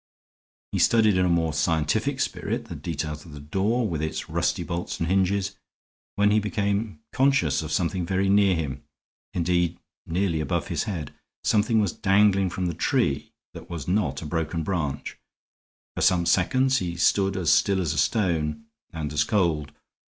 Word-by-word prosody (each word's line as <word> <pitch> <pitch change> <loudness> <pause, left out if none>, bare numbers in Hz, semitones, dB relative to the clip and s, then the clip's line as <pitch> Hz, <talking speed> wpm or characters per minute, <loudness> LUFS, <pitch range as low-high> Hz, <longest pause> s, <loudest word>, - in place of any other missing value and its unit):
He - - -1
studied 110 -4 +4
in 90 0 +3
a - - +1
more 85 -2 +1
scientific 80 -1 0
spirit - - -2
the - - -8
details 75 -2 -4
of 80 - -13
the 75 - -8
door, 100 +11 0
with 80 -5 -3
its 80 +1 -4
rusty 85 +1 0
bolts 85 +1 -4
and 85 - -1
hinges, 95 +1 +1 0.6
when 105 +1 +3
he 110 - +4
became 105 0 -2
conscious 140 -5 +2
of 80 -1 -6
something 90 +2 0
very 95 +1 +1
near 100 -1 +4
him 70 -4 -4 0.5
indeed, 85 -1 +1 0.3
nearly 85 -1 0
above 85 +1 -2
his 85 +2 -1
head. 85 -9 -5 0.3
Something 110 +1 +2
was 100 -5 +1
dangling 100 -1 +3
from 90 +1 -3
the 85 - -1
tree 70 -2 0 0.2
that - - -11
was 85 -4 -6
not 90 -7 0
a - - -7
broken 80 +1 -2
branch. 80 -6 -3 0.8
For - - -3
some 90 -2 +3
seconds 130 +10 +3
he 85 -2 -3
stood 95 +2 +2
as 85 -4 +3
still 100 -2 +3
as 80 -4 0
a - - -1
stone, 90 -2 0 0.3
and 75 -4 -4
as 75 - +3
cold. 80 -8 0
90 Hz, 170 wpm, -25 LUFS, 80-100 Hz, 0.8 s, studied